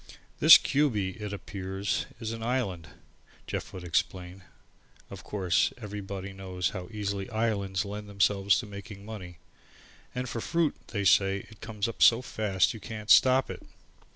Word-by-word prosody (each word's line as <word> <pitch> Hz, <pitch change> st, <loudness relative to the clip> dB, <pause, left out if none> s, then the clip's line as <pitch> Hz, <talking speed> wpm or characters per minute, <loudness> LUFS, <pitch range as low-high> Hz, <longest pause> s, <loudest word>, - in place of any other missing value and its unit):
"This -, -, +11 dB
Cubey, 110 Hz, -10 st, 0 dB
it 105 Hz, -1 st, -4 dB
appears 95 Hz, +1 st, -3 dB
is 110 Hz, -1 st, -4 dB
an 115 Hz, 0 st, -6 dB
island," 110 Hz, -9 st, -2 dB, 0.6 s
Jeff -, -, -5 dB
would 95 Hz, -, -8 dB
explain. 90 Hz, +2 st, -2 dB, 0.7 s
Of -, -, -9 dB
course, 90 Hz, -5 st, +1 dB
everybody 100 Hz, -3 st, -6 dB
knows 95 Hz, -2 st, -3 dB
how 95 Hz, -3 st, -6 dB
easily 100 Hz, -3 st, -4 dB
islands 105 Hz, -4 st, -1 dB
lend 105 Hz, +1 st, -7 dB
themselves 100 Hz, 0 st, +2 dB
to -, -, -9 dB
making 100 Hz, 0 st, -10 dB
money, 95 Hz, -6 st, -8 dB, 0.8 s
"and 125 Hz, 0 st, -3 dB
for 115 Hz, -1 st, -4 dB
fruit, 165 Hz, +1 st, +1 dB
they 100 Hz, -3 st, -3 dB
say 95 Hz, +1 st, +3 dB
it 110 Hz, -, -16 dB
comes 110 Hz, -1 st, -3 dB
up 115 Hz, -, -7 dB
so 120 Hz, +2 st, +6 dB
fast 105 Hz, -5 st, 0 dB
you 110 Hz, -, -9 dB
can't 110 Hz, -1 st, -4 dB
stop 130 Hz, +1 st, +6 dB
it." -, -, -8 dB
100 Hz, 155 wpm, -28 LUFS, 95-110 Hz, 0.8 s, This